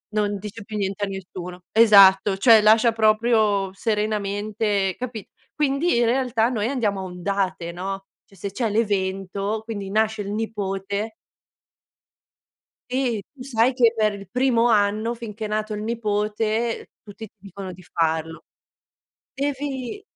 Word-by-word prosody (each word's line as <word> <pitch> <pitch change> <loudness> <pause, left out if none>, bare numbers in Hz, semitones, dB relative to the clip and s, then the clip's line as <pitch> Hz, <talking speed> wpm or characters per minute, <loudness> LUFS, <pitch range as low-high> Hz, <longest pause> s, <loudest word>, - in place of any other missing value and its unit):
non 205 -1 0
dice 210 +2 -8
più 215 +1 -6
niente 200 0 -1
a - - -7
nessuno, 180 -2 -7
esatto, 200 -3 +6
cioè 225 +2 +7
lascia 220 +2 +5
proprio 215 -3 +2
serenamente 210 -2 -1
capi 235 -5 -6 0.2
quindi 295 +2 +1
in 240 - +3
realtà 240 -1 +1
noi 220 -3 -1
andiamo 210 -8 -1
a - - -5
ondate, 185 -1 -2
no, 195 +2 -5 0.2
cioè 195 - -21
se 200 +2 -5
c'è 225 +1 -1
l'evento 200 -1 -1
quindi 205 -4 -6
nasce 220 0 +1
il 200 - -5
nipote 205 -1 -3 1.8
e 250 -5 0
tu 255 - -9
sai 250 -1 +2
che 235 -3 +4
per 215 -1 +2
il 195 -2 -10
primo 245 -2 +2
anno 215 +1 +2
finché 225 -2 -7
è - - -2
nato 215 0 -2
il 210 - -5
nipote 220 0 -1
tutti 210 +1 -10
ti 215 - -36
dicono 195 0 -8
di 180 +1 -13
farlo. 160 -1 -2 0.9
Devi 275 - -3
210 Hz, 140 wpm, -23 LUFS, 195-230 Hz, 1.8 s, cioè